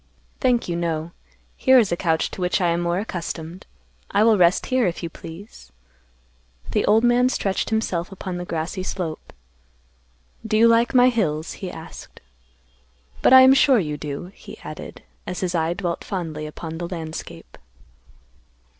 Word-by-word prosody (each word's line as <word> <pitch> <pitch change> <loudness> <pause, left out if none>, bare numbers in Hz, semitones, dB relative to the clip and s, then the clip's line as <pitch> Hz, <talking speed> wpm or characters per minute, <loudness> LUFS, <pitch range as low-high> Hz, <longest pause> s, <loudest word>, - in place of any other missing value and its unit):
"Thank 250 -3 +1
you, 170 - -2
no. 165 -1 -2 0.4
Here 260 -1 +5
is 220 -7 +3
a - - +2
couch 165 -2 0
to - - -7
which 180 0 +1
I 175 -2 +2
am 170 +1 0
more 175 0 0
accustomed. 175 -3 -5 0.4
I 205 - +3
will 225 -1 +5
rest 180 -2 +3
here, 255 -4 +1
if 175 0 -4
you 170 - -4
please." 165 - -12 1.0
The - - +1
old 220 +2 +4
man 245 +1 +4
stretched 195 -6 -1
himself 195 -6 -1
upon 185 -1 -6
the 175 - -4
grassy 170 +3 -3
slope. 180 -4 -5 1.1
"Do 215 - 0
you 230 +1 +6
like 230 +2 +3
my 250 0 +7
hills?" 160 -10 -1
he 190 - -6
asked. 160 -2 -11 1.0
"But - - +4
I 260 - +11
am 260 +1 +8
sure 270 -1 +5
you 150 -7 -1
do," 150 +4 -6
he - - -12
added, - - -9 0.2
as 180 - -4
his 180 -1 -1
eye 165 0 0
dwelt 175 -3 -3
fondly 160 -6 -4
upon 160 +1 -7
the 175 - -3
landscape. 160 - -8
180 Hz, 165 wpm, -22 LUFS, 165-220 Hz, 1.1 s, I